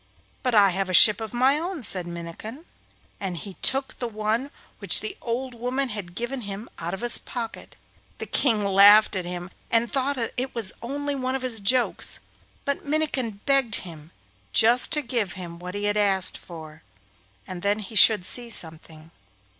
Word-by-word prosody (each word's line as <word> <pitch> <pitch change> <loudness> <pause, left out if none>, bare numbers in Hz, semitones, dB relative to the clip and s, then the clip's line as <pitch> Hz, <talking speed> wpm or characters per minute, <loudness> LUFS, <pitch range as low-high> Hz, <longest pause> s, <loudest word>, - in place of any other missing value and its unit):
'But 250 -3 0
I 200 -2 +6
have 190 +1 -2
a 185 - +2
ship 215 +3 +7
of 220 - -6
my 260 +4 +2
own,' 340 -3 -5
said 185 -4 -3
Minnikin, 170 - -9 0.5
and 185 -3 -4
he 200 +2 -7
took 270 0 +1
the 245 - -3
one 220 +4 -2 0.3
which - - +6
the 420 -2 -5
old 250 +2 -4
woman 250 +3 -2
had 200 -5 -7
given 245 +4 -4
him 205 +1 -7
out 170 +3 -4
of 195 - -11
his 240 0 +5
pocket. 230 -2 -7 0.4
The - - -6
King 220 -7 0
laughed 200 +2 +6
at 185 -2 -3
him 175 +1 -7 0.2
and 230 0 +1
thought 275 +1 0
that 230 -3 -3
it 255 +1 -4
was 220 -5 +4
only 285 +4 -4
one 260 -1 -2
of 265 - -4
his 240 -3 -1
jokes, 245 +5 +1 0.5
but 280 0 -2
Minnikin 275 -8 -2
begged 270 -6 +2
him 160 -3 -11 0.4
just 235 +3 +4
to 300 -1 0
give 235 -7 -2
him 170 -2 -9
what 180 +2 -8
he 205 - -4
had 205 0 0
asked 195 -3 +2
for, 160 -2 -12 0.6
and 180 -1 -8
then 205 +2 0
he 215 +1 -9
should 210 -2 +6
see 240 +3 +1
something. 160 -4 -8
220 Hz, 185 wpm, -24 LUFS, 190-255 Hz, 0.6 s, ship